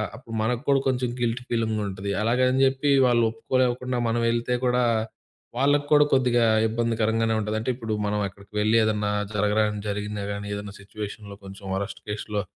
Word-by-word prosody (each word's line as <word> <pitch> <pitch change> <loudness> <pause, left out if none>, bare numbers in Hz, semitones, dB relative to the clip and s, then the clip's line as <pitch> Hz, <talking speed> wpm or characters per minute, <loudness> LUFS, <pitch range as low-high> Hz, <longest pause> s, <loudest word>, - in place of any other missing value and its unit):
అప్పుడు 115 -1 -9
మనకు 120 +1 0
కూడా 140 -1 +5
కొంచెం 125 -2 0
గిల్ట్ 120 +1 -1
ఫీలింగ్ 115 -2 0
ఉంటుంది, 100 +1 -4
అలాగని 125 +3 +2
జెప్పీ 135 +2 +1 0.2
వాళ్ళొప్పుకోలేకుండా 120 +2 +1
మనం 115 +1 0
వెళ్తే 120 +1 0
కూడా, 125 0 +2 0.7
వాళ్ళకి 145 +2 +3
కూడా 150 0 +6
కొద్దిగా 120 -3 +3 0.2
ఇబ్బందికరంగానే 115 0 0
ఉంటది. 105 0 -2
అంటే, 115 - -3
ఇప్పుడు 115 -3 -4
మనం 105 0 0
అక్కడికి 100 +2 -16
వెళ్ళి, 110 +2 +3
ఏదన్నా 105 -1 0 0.2
జరగరానిది 105 0 +1
జరిగినా 105 0 -3
గానీ, 100 0 -5
ఏదన్నా 100 0 -7
సిట్యుయేషన్‌లో 100 0 -8
కొంచెం 95 +1 -11
వరస్ట్ 100 +2 -4
కేష్‌లో, 105 0 -3
115 Hz, 155 wpm, -25 LUFS, 105-125 Hz, 0.7 s, కూడా